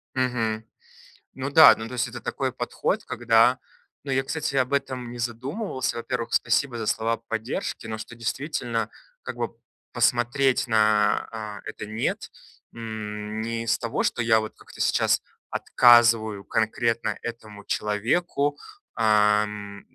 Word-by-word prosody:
Мгм. 115 -4 0 0.7
Ну 135 +1 -4
да, 155 0 +9
ну, 110 0 -6
то 125 - -9
есть 120 - 0
это - - -8
такой - - -2
подход, - - -2
когда 120 +2 +3 0.4
ну, 140 - -4
я, 130 0 +1
кстати, 150 0 -3
об 130 0 +1
этом 130 -3 -2
не 120 - -8
задумывался. 130 - -3
Во-первых, 120 0 -3
спасибо 130 -4 +1
за 110 - -3
слова 115 +2 0
поддержки, 115 0 -4
но 110 - -4
что, 115 +2 -9
действительно, 120 -2 -2 0.3
как - - -6
бы - - -3 0.4
посмотреть 125 +3 +2
на, 105 -1 +1
э, - - -4
это - - -7
нет, 110 +2 -2 0.4
м, 110 -1 -5
не 115 +1 -3
из 115 0 +1
того, 120 -2 -2
что 120 - 0
я 115 -1 +4
вот 110 0 -5
как-то - - -16
сейчас - - +2 0.3
отказываю 115 -4 +4
конкретно 115 +1 0
этому 110 -3 -8
человеку, 140 +8 0 0.4
ам, 105 -2 +2
115 Hz, 140 wpm, -25 LUFS, 110-125 Hz, 0.7 s, да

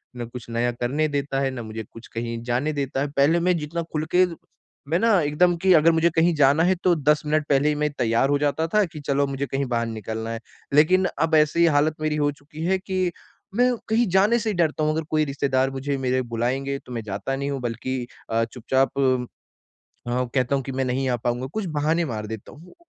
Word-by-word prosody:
ना 120 - -4
कुछ 120 0 -10
नया 120 +1 0
करने 125 +6 -1
देता 140 -2 -2
है, 135 -1 0
ना 125 -2 -6
मुझे 110 0 -6
कुछ 115 - -12
कहीं 115 0 -4
जाने 125 +6 -1
देता 135 -2 -2
है। 140 0 -2
पहले 150 +4 +3
मैं 180 0 +2
जितना 165 +2 -3
खुल 155 0 -1
के 185 - +6 0.6
मैं 165 - +2
ना 225 -4 +4
एकदम 170 +4 +2
कि 190 +2 +2
अगर 165 0 +6
मुझे 165 +1 +3
कहीं 165 +1 +4
जाना 145 +2 +4
है 180 +2 +4
तो 180 - +4
10 150 0 +2
मिनट 150 0 +1
पहले 140 +1 +3
ही 150 - 0
मैं 150 0 0
तैयार 115 +3 +2
हो 145 - +3
जाता 150 +2 0
था 210 -1 +5
कि 160 -3 -10
चलो 140 0 +1
मुझे 140 0 -3
कहीं 140 0 -2
बाहर 115 -1 0
निकलना 110 0 -5
है। 115 - -4 0.3
लेकिन 180 +6 +5
अब 160 +1 +2
ऐसी 155 +2 +4
हालत 150 0 +3
मेरी 155 -1 0
हो 145 -1 +1
चुकी 150 +2 -10
है 190 +1 +2
कि 185 -2 -1 0.4
मैं 250 +1 +3 0.2
कहीं 230 +1 +3
जाने 210 +5 +4
से 225 -1 -2
ही - - 0
डरता 155 -2 +1
हूँ 155 - +2
अगर 160 - -1
कोई 155 -1 +2
रिश्तेदार 135 -2 0
मुझे 135 +1 -3
मेरे 130 -1 0
बुलाएँगे 135 +4 -1
तो - - -12
मैं 115 - -3
जाता 105 +5 -3
नहीं 140 +1 -3
हूँ 140 - -3
बल्कि 125 +1 -3 0.2
अ, 115 0 +1
चुपचाप 130 +3 -1
उम, 130 -2 +2 0.9
अ, 125 +1 0
कहता 130 +1 +1
हूँ 135 - -2
कि 135 - -5
मैं 130 0 -1
नहीं 130 +1 -1
आ 125 - +1
पाऊँगा 120 +2 -2
कुछ 215 -2 -2
बहाने 160 +4 +1
मार 110 -7 -4
देता 110 -1 -8
हूँ। 170 +5 -15
140 Hz, 230 wpm, -24 LUFS, 125-160 Hz, 0.9 s, के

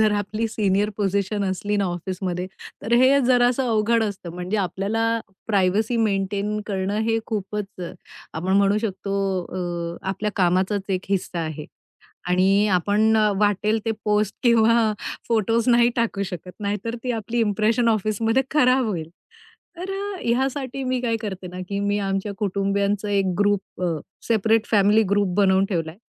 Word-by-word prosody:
जर 215 -1 +4
आपली 215 +3 -2
senior 205 -1 +1
position 200 0 0
असली 205 +2 -1
ना 200 - +1
ऑफिसमध्ये, 180 0 -3 0.4
तर 225 - -4
हे 265 +3 +5
जरासं 245 +1 +3
अवघड 225 +1 +2
असतं. 190 -4 -5
म्हणजे 180 +4 -3
आपल्याला 220 +4 0 0.3
प्रायव्हसी 210 +3 +1
मेंटेन 205 0 0
करणं, 200 +1 -1
हे 225 0 +1
खूपच 210 -1 -3 0.7
आपण 180 +4 -2
म्हणू 200 +1 +3
शकतो. 200 -2 -3 0.3
अ, 175 -2 -4
आपल्या 210 +2 -2
कामाचाच 185 +2 +2
एक 185 - 0
हिस्सा 190 -3 -1
आहे 155 -1 -5 0.6
आणि 195 +3 +3
आपण 210 +5 +2 0.2
वाटेल 210 +1 +2
ते 225 - +1
पोस्ट 210 -1 +1
किंवा 230 -2 +4 0.3
फोटोज 230 +1 +1
नाही 240 0 +5
टाकू 225 -4 0
शकत, 180 0 -7
नाहीतर 210 +3 -3
ती 250 - -1
आपली 230 +1 -2
इंप्रेशन 220 +2 +2
ऑफिसमध्ये 225 +4 +1
खराब 255 -3 +4
होईल. 165 -7 -3 0.7
तर 365 +2 -6
अ, 395 0 -4
ह्यासाठी 265 +2 -1
मी 255 -1 0
काय 230 -2 0
करते 190 -3 -5
ना, 180 +1 -8
की 200 0 -2
मी 205 0 0
आमच्या 195 +1 -2
कुटुंबियांचा 200 +1 0
एक 195 -2 +1
ग्रुप 205 -2 0
अ, 165 -3 0 0.3
सेपरेट 225 0 +2
फॅमिली 210 +1 +5
ग्रुप 200 -3 +1
बनवून 190 -1 +4
ठेवलाय. 165 -1 -2
205 Hz, 145 wpm, -23 LUFS, 190-225 Hz, 0.7 s, हे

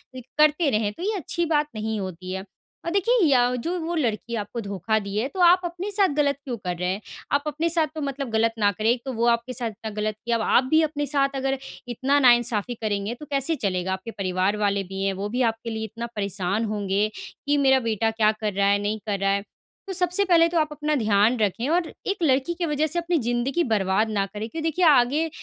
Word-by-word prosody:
करते 300 +5 +2
रहें, 215 -3 0
तो 340 - -8
ये 425 +3 0
अच्छी 345 -1 -2
बात 300 -2 +1
नहीं 215 0 -2
होती 185 -1 -6
है 190 0 -5 0.4
और 335 - -1
देखिए 400 +6 +2
या 270 -4 +5 0.2
जो 335 +9 -2
वो 335 +1 -3
लड़की 235 -5 -1
आपको 225 +2 -4
धोखा 200 +1 -1
दी 200 -1 -6
है, 225 +5 +1
तो 370 - -9
आप 355 +1 +6
अपने 350 +4 -4
साथ 400 -1 +3
ग़लत 285 -2 +2
क्यों 255 -5 -4
कर 180 -4 -4
रहे 180 +1 -1
हैं? 195 +3 -2 0.3
आप 285 0 +2
अपने 310 +3 -1
साथ 325 -2 +2
तो 310 - -4
मतलब 275 -2 -3
ग़लत 225 +1 +2
ना 205 -1 +4
करें, 215 +3 -1
एक 240 0 +1
तो 265 - -3
वो 235 0 0
आपके 235 +2 +1
साथ 235 -1 -2
इतना 220 +1 -8
ग़लत 215 0 -1
की, 235 - -2
अब 230 -1 +2
आप 245 - +4
भी 315 0 +6
अपने 295 -1 -1
साथ 275 -1 0
अगर 270 0 -1 0.3
इतना 260 +4 +1
नाइन्साफ़ी 240 -3 +3
करेंगे 205 0 -1
तो 300 - -8
कैसे 275 +4 +1
चलेगा? 190 - -1
आपके 190 +5 -6
परिवार 190 0 -1
वाले 200 -1 +1
भी 195 +1 -5
हैं, 195 0 +1
वो 195 +2 -4
भी 245 +4 -1
आपके 225 +1 -9
लिए 220 -1 -4
इतना 230 +2 -6
परेशान 200 +1 -1
होंगे, 205 -1 0 0.4
कि 290 0 +3
मेरा 265 -2 +4
बेटा 225 -2 0
क्या 220 -1 +3
कर 210 -2 -1
रहा 200 +1 +2
है? 200 0 +3
नहीं 210 +1 -2
कर 200 -2 -1
रहा 195 0 +2
है। 200 0 0 0.4
तो 385 - -3
सबसे 360 +2 +1
पहले 335 -3 +5
तो 340 - -1
आप 310 - +2
अपना 300 +1 -2
ध्यान 215 -1 +3
रखें 215 +4 0
और 340 +1 +2 0.2
एक 400 0 0
लड़की 275 +2 +2
की 345 0 -2
वजह 300 0 0
से 330 +3 -1
अपनी 340 0 0
ज़िंदगी 240 +8 0
बर्बाद 210 - +1
ना 200 -2 0
करें, 210 +2 -6
क्योंकि 325 - -5
देखिए 345 +3 +1
आगे 295 +2 +4
235 Hz, 240 wpm, -24 LUFS, 205-300 Hz, 0.4 s, आप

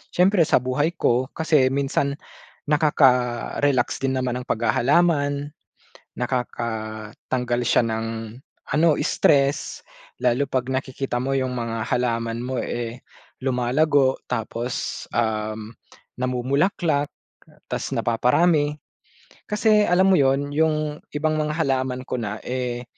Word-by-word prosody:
siyempre 180 -2 +4
sa 125 - +3
buhay 145 +6 0
ko. 125 -5 +1
Kasi 155 -5 +3
minsan 140 +1 0 0.6
nakaka-relax 130 -3 +2
din 135 0 0
naman 125 -1 -1
ang 125 - -9
paghahalaman, 145 +4 +1 0.7
nakakatanggal 120 0 -3
siya - - +4
ng 110 0 -2 0.7
ano, 160 +3 +4
stress 140 -1 +2 0.4
lalo 125 +3 +2
'pag 130 -1 -2
nakikita 130 -1 -2
mo 135 +2 -1
yung 130 -1 -1
mga 115 -2 -3
halaman 115 -2 0
mo 130 0 -3
eh, 120 +1 -4 0.4
lumalago. 130 +2 +2
Tapos, 115 +2 -3
um, 110 -1 -2 0.4
namumulaklak 140 +5 0 0.6
ta's - - -3
napaparami. 145 +6 +2 0.8
Kasi, 210 0 +3
alam 185 +2 +4
mo - - +6
yun, 140 +1 +2
yung 155 0 0
ibang 155 +1 0
mga 150 0 -1
halaman 130 -4 -1
ko 125 - -3
na 105 -2 -3
eh, 125 -1 -3
130 Hz, 110 wpm, -23 LUFS, 120-150 Hz, 0.8 s, mo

